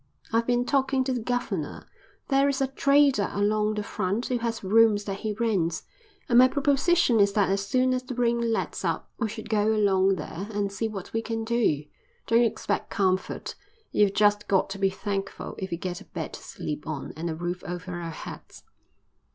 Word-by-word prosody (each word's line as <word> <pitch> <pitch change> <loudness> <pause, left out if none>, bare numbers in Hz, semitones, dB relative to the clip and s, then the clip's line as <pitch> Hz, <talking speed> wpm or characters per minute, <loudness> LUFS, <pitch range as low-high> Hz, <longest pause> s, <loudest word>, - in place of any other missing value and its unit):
"I've 230 0 +2
been 245 0 +2
talking 270 -1 +2
to 260 0 -1
the 245 - -2
governor. 245 +2 -3 0.4
There's 275 0 +3
a 270 - +2
trader 275 -4 +3
along 210 +1 +1
the 210 - -2
front 205 +3 -2
who 250 -1 -1
has 230 -2 -3
rooms 210 +1 +4
that 195 -1 -4
he 215 -1 -2
rents, 200 -7 0 0.4
and 240 0 +5
my 255 - +8
proposition 280 -1 +3
is 200 0 +4
that 200 -2 +2
as 200 0 -1
soon 255 +1 +2
as 255 - 0
the 255 0 -7
rain 235 -1 +1
lets 225 - -2
up - - -2
we 225 -3 0
should 220 +1 -7
go 215 0 +2
along 195 -2 +3
there 185 +2 -6
and 205 -1 -1
see 210 +3 -2
what 200 -4 -7
we 225 - 0
can 225 -1 -3
do. 220 -11 +1 0.4
Don't 230 +1 +4
expect 220 -3 -1
comfort. 185 -1 -1 0.4
You've 205 -1 +3
just 205 0 +3
got 195 0 +2
to 195 - -5
be 195 -1 +3
thankful 195 0 -4
if 190 - -4
we 170 - -3
get 175 0 -5
a - - -13
bed - - -6
to - - -8
sleep 150 +1 -6
on 155 -3 -5
and 165 +2 -3
a 160 - -3
roof 175 +2 -4
over 180 +1 -6
our 165 - -4
heads." 160 - -9
215 Hz, 200 wpm, -26 LUFS, 195-240 Hz, 0.4 s, my